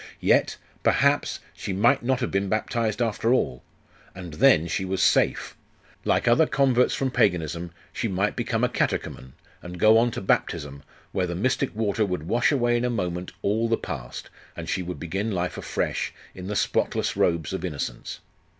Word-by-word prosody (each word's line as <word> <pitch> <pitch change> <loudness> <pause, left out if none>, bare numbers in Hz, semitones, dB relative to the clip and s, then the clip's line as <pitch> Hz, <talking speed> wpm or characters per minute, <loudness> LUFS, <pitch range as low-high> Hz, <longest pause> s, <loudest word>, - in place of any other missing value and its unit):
Yet - - +2 0.2
perhaps, - - +2
she 95 - -5
might 120 +8 +3
not 130 +1 0
have 125 - -1
been 95 0 0
baptized 110 +1 0
after 115 +1 0
all. 65 - +1 0.5
And 90 -3 -8
then 80 +1 +5
she 95 - -2
was 95 0 -2
safe. - - +2 0.5
Like - - +1
other 120 +7 +5
converts 130 -2 +2
from 135 -1 -1
Paganism, 85 - 0 0.2
she 115 - -2
might 100 +1 0
become - - -1
a - - +5
catechumen, 65 0 -2 0.3
and 90 0 -8
go 110 +3 +6
on 120 +1 +3
to - - -5
baptism, 70 -6 -1 0.3
where 95 -2 0
the 85 - -4
mystic 130 +5 0
water 110 0 0
would 90 -6 -2
wash 120 - +2
away 120 -4 +2
in 120 - -1
a 125 - +1
moment 90 -5 -3
all 110 +3 +1
the 115 - +2
past, 70 -9 -7 0.3
and 85 -1 -6
she 90 +3 -1
would 90 0 -6
begin 95 +6 -3
life 90 -3 -2
afresh, - - -2 0.2
in 90 0 -8
the 105 - -3
spotless - - 0
robes 85 -1 +1
of 95 - -4
innocence. 70 -8 -5
100 Hz, 175 wpm, -25 LUFS, 90-120 Hz, 0.5 s, go